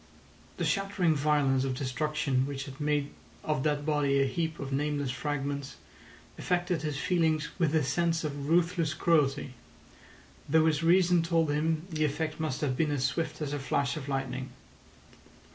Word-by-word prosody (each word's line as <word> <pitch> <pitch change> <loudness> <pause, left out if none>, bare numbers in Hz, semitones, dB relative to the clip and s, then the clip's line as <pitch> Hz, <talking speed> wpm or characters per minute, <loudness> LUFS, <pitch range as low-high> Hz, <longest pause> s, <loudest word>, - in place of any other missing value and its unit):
The - - -1
shattering 195 -4 +1
violence 145 -3 +2
of 135 -1 -1
destruction 135 0 -1
which 135 -1 -4
had 135 +2 -10
made 145 -1 0 0.3
of 150 -3 0
that 145 0 0
body 145 -3 +2
a 135 - +4
heap 160 +3 -2
of 135 -1 -4
nameless 145 -1 -1
fragments 140 +1 -3 0.6
affected 175 -2 0
his 150 -2 -3
feelings 160 -2 +1
with 165 -3 +2
a 155 - +3
sense 165 +5 0
of 145 -1 -4
ruthless 170 -1 +2
cruelty, 145 -5 +1 1.0
though 160 +2 +4
his 155 -1 +2
reason 175 +1 +4
told 165 -2 +1
him 160 +2 0
the 155 -1 0
effect 155 +2 -2
must 155 -4 -2
have 135 -4 0
been 155 +3 +1
as 140 -3 0
swift 160 +3 -2
as 145 -1 -3
a 145 - -2
flash 135 0 0
of 145 -2 -6
lightning. 135 -1 -3
150 Hz, 160 wpm, -29 LUFS, 140-160 Hz, 1.0 s, a